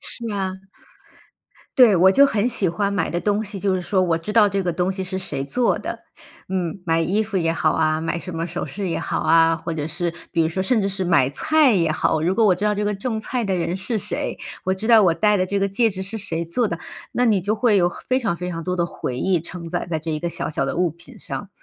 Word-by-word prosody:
是 230 -2 -1
啊。 190 -2 -2 1.2
对， 245 -6 +7
我 185 +2 +6
就 280 +7 +6
很 220 -3 0
喜 205 -6 +1
欢 200 +4 -1
买 200 -4 0
的 175 - -2
东 210 +2 0
西 200 -2 -7
就 195 -2 +1
是 185 - -1
说 185 +1 +1
我 170 -2 +1
知 210 +6 -6
道 210 -2 +5
这 195 -1 -2
个 175 - 0
东 180 +3 0
西 190 0 -4
是 190 +1 -4
谁 185 -7 -3
做 235 - +1
的。 - - -6 0.5
嗯， 185 -1 -3
买 165 -1 +1
衣 200 +6 +1
服 210 -2 -4
也 165 -2 +1
好 160 -1 +1
啊、 155 0 +1
买 165 +1 -2
什 175 -1 -7
么 165 - -2
首 175 - -4
饰 200 -2 -4
也 170 - -1
好 - - -2
啊， 165 0 +4
或 165 - -5
者 150 -1 -3
是 170 +1 -2 0.2
比 165 - +2
如 160 - +1
说 185 +3 -3
甚 220 +3 +2
至 195 - 0
是 190 -1 -2
买 135 -6 +3
菜 310 - +3
也 165 -4 +2
好， 155 - +1
如 175 +4 +1
果 225 0 +3
我 185 - +5
知 205 - -3
道 210 0 +2
这 205 - -2
个 205 0 0
种 220 +2 -3
菜 240 +2 -2
的 195 -2 0
人 175 0 -1
是 195 +4 0
谁， 205 - -2 0.3
我 190 +1 +1
知 215 +4 -5
道 225 -2 +7
我 170 - +3
戴 210 +5 +3
的 185 - 0
这 200 +1 -1
个 200 - +1
戒 225 +4 +2
指 190 -1 -4
是 200 +4 -4
谁 170 -4 -3
做 220 +8 0
的， 170 - -4 0.3
那 250 - +1
你 215 -5 +3
就 205 +4 0
会 220 -1 +2
有 175 -2 +4
很 - - -10
非 255 0 +3
常 205 -9 -1
非 180 +1 -4
常 165 -1 -5
多 180 0 -1
的 170 - +1
回 125 -6 -5
忆 185 -3 +1
承 170 0 -8
载 175 +1 -3
在 160 - 0
这 160 +1 -4
一 155 - -1
个 170 - -2
小 - - -3
小 140 - -1
的 - - -3
物 175 -1 +2
品 170 +2 -14
上。 200 - -5
185 Hz, 295 characters per minute, -22 LUFS, 170-210 Hz, 1.2 s, 对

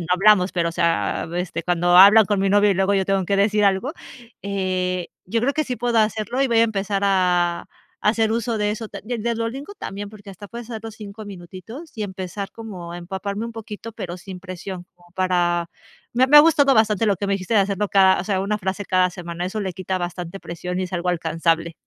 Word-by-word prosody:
no 170 - -5
hablamos, 195 -1 +4
pero, 170 -2 0
o - - -10
sea, 165 -1 0
este, 175 -1 -3
cuando 175 0 +3
hablan 205 +3 +9
con 200 -1 0
mi 195 - +2
novio 205 +1 +4
y - - +2
luego 195 +2 +2
yo 190 -1 +2
tengo 195 -2 0
que 200 - +1
decir 210 +1 +2
algo, 200 +10 +1 0.5
eh, 185 -2 -2 0.2
yo 230 +4 0
creo 280 +3 +2
que 310 +1 0
sí 250 - -4
puedo 235 0 +1
hacerlo 215 +4 0
y - - +3
voy 230 -1 +3
a - - +6
empezar 200 -2 -1
a 180 -3 +2 0.4
a - - +2
hacer 220 0 +2
uso 230 0 -1
de 210 0 0
eso, 220 +1 -4
de 235 +2 -5
de 235 +2 -1
Duolingo 260 - -4
también, 200 - -6
porque 205 -1 -12
hasta 195 +2 -11
puedes 235 0 -9
hacer 220 -1 -5
los 225 -1 -8
5 210 0 -9
minutitos 195 - -10
y - - -1
empezar 195 0 -5
como 185 -7 -8
a - - -6
empaparme 195 +4 -4
un 230 - -6
poquito, 225 0 -8
pero 180 -4 -6
sin 185 0 -9
presión, 185 -1 -7 0.3
para 175 -2 +1 0.5
me 255 +2 +4
me 295 +2 +8
ha - - +12
gustado 295 -3 +4
bastante 220 0 +3
lo 200 -3 +2
que 200 - -3
me 200 - +1
dijiste 190 +3 -4
de 210 - +5
hacerlo 200 +1 -1
cada, 190 -1 +5
o 175 - -3
sea, 190 -2 0
una 205 +2 -1
frase 190 0 -4
cada 185 -1 +3
semana, 175 -1 -6
eso 210 +4 -3
le 190 -3 -3
quita 185 0 -3
bastante 175 +1 -5
presión 180 +2 -5
y - - -1
es 180 - -6
algo 180 +1 0
alcanzable. 165 0 0
195 Hz, 230 wpm, -22 LUFS, 180-215 Hz, 0.5 s, ha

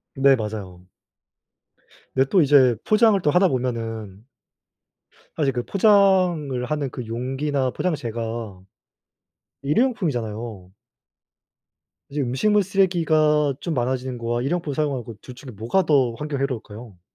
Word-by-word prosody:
네. 135 0 +5
맞아요. 100 -6 -7 1.3
근데 130 0 +2
또 190 - +4
이제 135 -4 +5
포장을 215 -1 +4
또 150 - +2
하다 180 +3 +4
보면은 115 - -4 1.1
사실 140 -4 0
그 120 -1 -2
포장을 185 - +2
하는 145 -1 -2
그 125 - -6
용기나 130 +3 -2
포장재가 115 - -4 1.0
1 145 +2 0
회용품이잖아요. 115 - -2 1.4
이제 145 +1 -3
음식물 200 - +1
쓰레기가 160 -6 +2
좀 170 - -3
많아지는 130 0 -2
거와 120 0 -2
1 135 - -2
회용품 165 -4 -2
사용하는 140 -4 -1
거 115 - -9
둘 125 - -11
중에 130 +1 -11
뭐가 115 - 0
더 135 -6 +2
환경에 150 -1 -4
해로울까요? 115 -6 -6
135 Hz, 275 characters per minute, -23 LUFS, 115-155 Hz, 1.4 s, 네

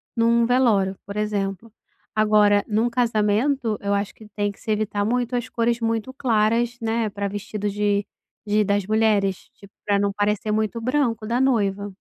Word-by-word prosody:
num 235 0 +3
velório, 215 -7 +2
por 200 +1 -7
exemplo. 205 0 -2 0.4
Agora 210 -1 +4
num 220 +2 +1
casamento, 230 +1 +1
eu 200 0 -1
acho 200 0 -1
que 215 - -15
tem 205 -1 0
que 200 - -19
se 220 - -4
evitar 210 -1 -1
muito 245 +1 0
as 240 0 -2
cores 235 0 0
muito 230 +1 -1
claras, 235 -1 +1
né, 225 -1 0
pra 200 0 -3
vestido 205 +1 -4
de 205 0 0 0.4
de 210 0 +2
das 200 0 +1
mulheres, 215 -3 +2 0.2
tipo, 200 0 -17
pra 200 -1 +2
não 200 0 +1
parecer 210 +1 -1
muito 220 +2 -1
branco 240 -4 0
da 240 +2 0
noiva. 205 -6 +1
215 Hz, 170 wpm, -23 LUFS, 205-230 Hz, 0.4 s, Agora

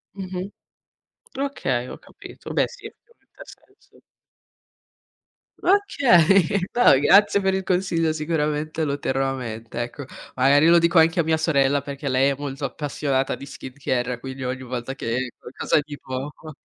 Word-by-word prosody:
Mh-mh. 190 0 -6 0.9
Okay, 135 - -2
ho - - -8
capito. - - -12
Beh - - +2
sì, - - -14
ovviamente 475 +1 -16
ha - - -7
senso. - - -20 1.6
Okay, 200 - +3 0.2
no 190 - +6
grazie 200 +6 +5
per 190 0 +1
il 190 0 -1
consiglio 175 -3 0
sicuramente 155 0 -2
lo 140 -1 -1
terrò 135 -1 -1
a - - -2
mente, 115 -1 -6
ecco. 130 +3 -8 0.3
Magari 140 +4 +4
lo 170 0 +6
dico 170 +1 +2
anche 165 +1 +4
a - - +4
mia 160 0 +1
sorella 140 -3 +2
perché 140 0 -5
lei 130 +2 +3
è - - -2
molto 140 -1 -5
appassionata 135 -1 -2
di 140 - -10
skincare, 125 -3 -4
quindi 130 0 -7
ogni 130 +1 -4
volta 125 +1 -5
che 125 0 -3
qualcosa 135 - -1
di 145 -1 -9
poco. 145 +4 -7
145 Hz, 150 wpm, -23 LUFS, 130-170 Hz, 1.6 s, no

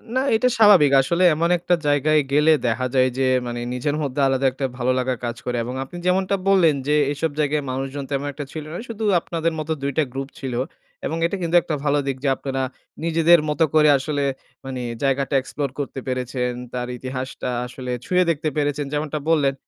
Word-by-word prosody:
না - - +3 0.2
এটা 250 +3 +3
স্বাভাবিক। 200 -10 +7
আসলে 170 +6 0
এমন 170 +2 +1
একটা 175 +1 +1
জায়গায় 150 +2 +3
গেলে 150 +2 +5 0.2
দেখা 130 +3 0
যায় 130 0 +4
যে, 135 - +2 0.2
মানে 120 0 -4
নিজের 145 +4 -1
মধ্যে 140 0 -3
আলাদা 135 0 +1
একটা 135 +1 -3
ভালো 125 +1 +1
লাগার 125 -1 -1
কাজ 120 0 -3
করে। 125 -1 -1
এবং 125 +2 -5
আপনি 175 +6 -10
যেমনটা 190 +2 +2
বললেন 175 -6 +5
যে, 150 - +3 0.2
এসব 150 +2 -2
জায়গায় 150 0 +1
মানুষজন 135 +2 -4
তেমন 140 +1 -1
একটা 145 +1 -6
ছিল 155 -2 -6
না - - -4
শুধু 220 -1 -5 0.2
আপনাদের 165 -1 -2
মতো 155 +1 -4
২ 140 0 -1
টা 155 - +4
গ্রুপ 135 +1 -4
ছিল। 130 -3 -4 0.5
এবং 165 - -2
এটা 185 - -1
কিন্তু 170 0 0
একটা 155 -2 -3
ভালো 145 0 +2
দিক 135 -1 -1
যে 140 - +2
আপনারা 135 -1 -3 0.4
নিজেদের 165 0 +5
মতো 155 +2 +2
করে 150 -1 +6
আসলে 145 +1 -2 0.4
মানে 130 -2 -4 0.2
জায়গাটা 135 +1 +1
এক্সপ্লোর 140 +1 -4
করতে 135 -1 -4
পেরেছেন, 125 -1 -2 0.2
তার 125 0 -3
ইতিহাসটা 130 0 -5 0.2
আসলে 125 0 -6
ছুঁয়ে 180 0 +3
দেখতে 155 -1 0
পেরেছেন 145 0 0
যেমনটা 150 0 -2
বললেন। 145 -4 +3
145 Hz, 195 wpm, -22 LUFS, 130-160 Hz, 0.5 s, স্বাভাবিক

